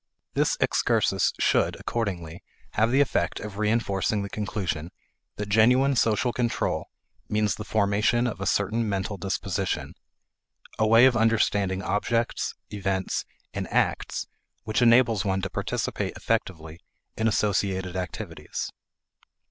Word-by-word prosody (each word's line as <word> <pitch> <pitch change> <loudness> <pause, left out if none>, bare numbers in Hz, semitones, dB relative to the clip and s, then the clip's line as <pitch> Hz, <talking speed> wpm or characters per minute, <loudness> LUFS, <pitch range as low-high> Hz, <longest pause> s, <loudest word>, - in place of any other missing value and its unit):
This - - +1
excursus - - +2
should, - - +2
accordingly, 90 -7 -3 0.3
have 110 +2 +2
the 135 +3 +4
effect 90 -10 0
of 105 -1 -7
reinforcing 105 -2 +1
the 100 - -6
conclusion 95 -6 -3 0.5
that 105 - -4
genuine 125 +6 +4
social 115 +1 +2
control 120 -2 -1 0.4
means 105 -1 +1
the 105 - -6
formation 105 +3 +2
of 110 -6 -3
a 100 - -1
certain 110 +3 +1
mental 100 +1 -2
disposition; 95 0 -2 0.9
a 110 - +3
way 115 +3 +7
of 130 -2 +5
understanding 105 -4 +2
objects, 115 +4 -1 0.2
events, 95 -2 -2 0.3
and - - -4
acts - - 0 0.4
which 110 +3 0
enables 115 -3 +5
one 95 -2 -1
to 95 - -3
participate - - -2
effectively 85 -8 -2 0.4
in 110 - +1
associated 95 -3 0
activities. 90 -2 -5
105 Hz, 125 wpm, -26 LUFS, 95-115 Hz, 0.9 s, way